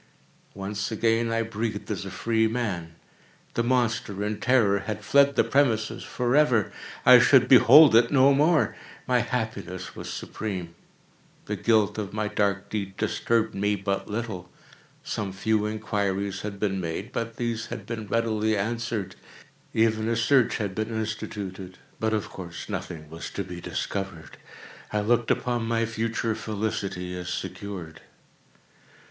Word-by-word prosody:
Once 100 +2 -4
again 115 +1 +1
I 115 0 +1
breathed 110 -1 -4
as 100 -2 -3
a - - -5
freeman. 110 -5 -1 0.6
The - - +1
monster, 115 -5 0
in 105 0 -2
terror, 115 -6 +3
had 105 +1 -5
fled 140 +2 +4
the - - +4
premises 120 -6 +1
forever! 125 -3 +2 0.3
I - - +10
should - - +5
behold 150 -6 +8
it 115 +1 +6
no 140 0 +5
more! 150 +3 +3 0.3
My 125 -1 +3
happiness 110 -7 -4
was - - -6
supreme! 95 -6 -5 0.7
The - - -2
guilt 110 -2 +2
of 100 -2 -5
my 105 0 -1
dark 100 -2 0
deed 100 -2 -4
disturbed 110 +1 0
me 105 +1 +1
but 100 0 -2
little. 105 -5 -4 0.5
Some 100 -3 -3
few 105 +2 0
inquiries 100 -2 -2
had 100 -1 -6
been 95 -2 -1
made, 90 +7 -4
but 115 -2 -3
these 115 -1 -2
had 105 - -7
been 110 -2 -5
readily 110 -1 +1
answered. 115 -1 -2 0.6
Even 110 0 +2
a 115 - +1
search 120 +2 +3
had 100 -4 -3
been 110 +2 -2
instituted—but 105 -2 -5
of 110 -2 -1
course 85 -3 -8
nothing 75 -3 -5
was 80 +2 -7
to 100 - -4
be 90 -1 -8
discovered. 95 -5 -5 0.5
I 105 - 0
looked 120 +2 +1
upon 120 -2 0
my 115 0 +1
future 115 0 -1
felicity 100 -4 -3
as 90 -1 -5
secured. 95 -3 -6
110 Hz, 140 wpm, -26 LUFS, 100-115 Hz, 0.7 s, I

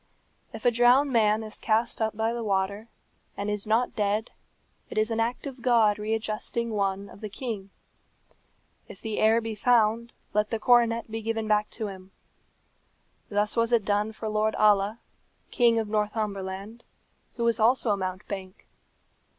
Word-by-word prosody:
"If 225 +1 -9
a 245 - +6
drowned 245 +4 +4
man 215 -1 +3
is 215 -1 -8
cast 225 +1 0
up 220 -1 -1
by 225 +1 0
the 235 -1 -4
water, 200 +1 -1 0.5
and 205 +1 -2
is 210 0 -2
not 225 +3 +1
dead, 210 +1 0 0.6
it - - -7
is 215 +1 +1
an 225 - -1
act 235 +4 -1
of 265 -3 -7
God 225 -4 +3
readjusting 220 +2 -2
one 200 -1 -1
of 200 - -14
the 215 - -5
king. 205 -3 -5 1.2
If - - -12
the 220 -2 -4
heir 220 +1 +4
be 225 0 -4
found, 230 +1 +2 0.2
let 210 0 +1
the 225 - -1
coronet 230 -1 +3
be 225 0 -4
given 225 0 -2
back 210 0 +2
to 225 - -3
him. 190 -2 -8 1.2
Thus 210 0 0
was 230 0 +1
it 230 -4 +3
done 210 +1 +1
for 220 0 -6
Lord 215 0 0
Alla, 210 0 +3 0.5
King 235 -2 +3
of 220 -1 0
Northumberland, 210 0 -3 0.5
who 235 - -3
was 235 0 +2
also 230 0 +3
a - - +3
mountebank. 190 0 -6
220 Hz, 165 wpm, -27 LUFS, 210-230 Hz, 1.2 s, a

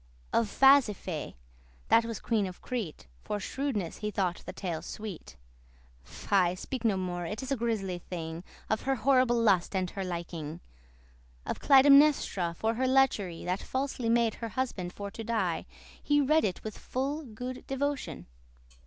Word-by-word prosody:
*ceases - - -30
Of 230 -2 +2
Phasiphae, 235 - +4 0.5
that 230 - +5
was 230 -2 -4
queen 215 -4 0
of 180 - -9
Crete, 225 -11 -5 0.2
For 210 - -3
shrewedness* 210 - -3
he 210 - -2
thought 185 -4 -1
the - - -3
tale 170 -5 -4
sweet. 195 - -8 0.7
*wickedness - - -12
Fy, 185 -3 +3
speak 250 +6 -5
no 215 -4 +2
more, 175 -2 -3
it 210 +7 -4
is 265 - -6
a - - +3
grisly 215 -7 -2
thing, 165 -1 -6 0.2
Of 220 - 0
her 270 0 0
horrible 255 -2 +3
lust 200 -4 +3
and 185 -2 0
her 195 - -4
liking. 170 -3 -5 0.9
Of - - -3
Clytemnestra, 275 - +5
for 225 +1 0
her 260 +3 0
lechery 245 -10 +2
That 180 +2 -1
falsely 260 -3 -2
made 230 -1 +3
her 230 - -3
husband 210 -8 -3
for 200 +1 -7
to 225 - -7
die, 215 -7 -1 0.3
He 290 0 +3
read 305 +3 +3
it 185 -3 -3
with 215 -1 -6
full 280 +5 -2
good 250 +1 -7
devotion. 280 +1 -2
215 Hz, 165 wpm, -30 LUFS, 180-260 Hz, 0.9 s, that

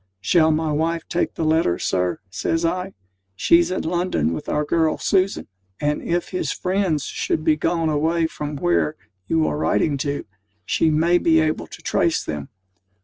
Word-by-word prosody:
"Shall 160 - +3
my 155 0 +1
wife 165 +2 0
take 175 - -1
the 165 - -2
letter, 155 - +2
Sir?" 90 -1 -1
says 165 - -1
I. 180 +3 -2 0.4
"She's 170 - +4
in 185 - -2
London 170 - 0
with 80 - -5
our 150 - 0
girl, 160 0 +1
Susan; 195 0 +1 0.3
and, 150 0 0
if 175 +1 -1
his 185 - -2
friends 185 -6 0
should 155 - -2
be 155 -1 +3
gone 165 +1 0
away 160 +2 +1
from 150 -2 -5
where 160 0 +1 0.3
you 160 +3 +2
are - - -1
writing 150 -1 +1
to, 140 +1 -3 0.4
she 160 - +2
may 165 +3 +3
be 160 -2 +4
able 155 0 0
to - - -12
trace - - +1
them." 75 -2 -5
160 Hz, 170 wpm, -22 LUFS, 150-170 Hz, 0.4 s, She's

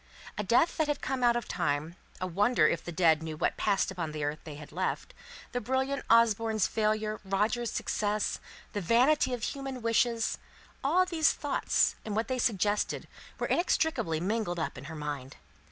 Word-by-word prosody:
A - - -2
death 240 - +3
that 315 - +2
had 295 -1 -1
come 260 -2 -2
out 240 -1 +5
of 240 -2 -2
time; 150 +3 -1 0.2
a 185 - -2
wonder 190 0 +3
whether 170 - 0
the 175 - -7
dead 160 -2 +3
knew 160 -1 -5
what - - 0
passed 200 -2 +1
upon 165 -5 -4
the 150 -1 -3
earth 145 +1 -2
they 155 -2 -7
had 150 0 -11
left 185 +4 -3 0.4
the 245 - -2
brilliant 265 +4 -1
Osborne's 225 -2 +4
failure, 215 0 0
Roger's 210 +5 0
success; 210 0 -1 0.3
the 205 - -2
vanity 255 - +3
of 245 -3 -3
human 270 -2 -4
wishes, 230 0 +1 0.4
all 345 +7 +4
these 325 -4 +2
thoughts, 290 -1 +1
and 210 -2 -4
what 220 +3 -1
they 255 -1 -1
suggested, 210 -2 0 0.3
were - - -2
inextricably 320 - +1
mingled 195 0 -1
up 160 - -2
in 130 +1 -9
her 160 +2 -7
mind. 145 -3 -5
215 Hz, 180 wpm, -30 LUFS, 170-245 Hz, 0.4 s, out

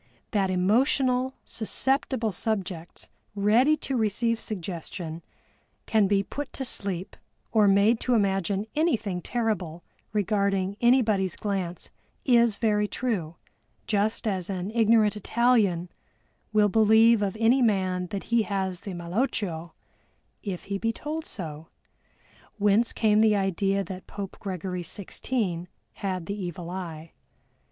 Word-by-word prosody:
That 195 -3 +1
emotional, 250 +7 +2
susceptible 250 0 0
subjects 185 -4 -3 0.3
ready 230 +9 +4
to 270 - -1
receive 230 +1 0
suggestion 170 -3 -5 0.6
can 215 -3 +3
be 200 0 +2
put 290 +7 -6
to 265 - -3
sleep 195 -6 -2 0.4
or 215 -2 +4
made 200 +4 +4
to 250 - +1
imagine 195 -1 +1
anything 225 - 0
terrible 185 -8 -2 0.3
regarding 200 -2 0
anybody's 220 -7 +3
glance 190 -4 -4 0.3
is 235 -5 +4
very 210 -2 +2
true, 200 -10 -2 0.5
just 215 +1 0
as 190 -3 -2
an 190 +1 -3
ignorant 225 -2 +4
Italian 210 -5 +2 0.6
will 210 -1 +4
believe 220 +2 +5
of 200 +1 -1
any 235 +4 +4
man 185 -5 +1
that 195 +2 -5
he 235 -1 +2
has 190 -3 -2
the 195 -3 -6
malocchio 175 -2 -2 0.7
if 190 -4 -5
he 200 0 -3
be 225 +2 0
told 305 +6 -5
so, 160 -6 -6 0.9
whence 210 +3 +3
came 215 -1 +3
the 220 -1 +5
idea 195 0 +1
that 190 -1 -8
Pope 200 -2 -7
Gregory 185 -2 -4
XVI 185 -1 -3 0.3
had 185 -3 -3
the 200 - -3
evil 175 0 -5
eye. 165 -3 -6
205 Hz, 125 wpm, -26 LUFS, 185-225 Hz, 0.9 s, believe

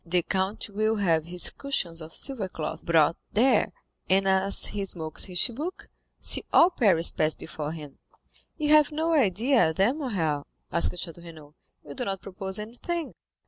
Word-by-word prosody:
The 175 0 +1
count 190 +4 -2
will 215 +2 +1
have 165 -6 +1
his 175 +1 +1
cushions 175 -12 -2
of 160 +1 -9
silver 240 -9 +1
cloth 160 -1 -5
brought 165 -1 +3 0.2
there, 235 +1 +3 0.4
and 195 +1 +3
as 190 +1 +3
he 205 -1 -2
smokes 160 -5 -1
his 180 -2 -6
chibouque, 290 +9 -2 0.3
see - - +1
all 345 +2 +6
Paris 190 - +3
pass 155 0 +1
before 155 -2 -6
him." 150 -4 -10 0.6
"You 300 -2 -1
have 305 -1 +5
no 320 +2 0
idea, 230 - +3
then, 235 - +1
Morrel?" 165 - -2 0.2
asked 170 +2 +1
Château 170 -1 -7
Renaud; 155 -3 -13 0.3
"you 140 - -7
do - - -4
not 195 -1 -3
propose 190 0 -5
anything." 245 +10 -5
190 Hz, 165 wpm, -26 LUFS, 165-240 Hz, 0.6 s, all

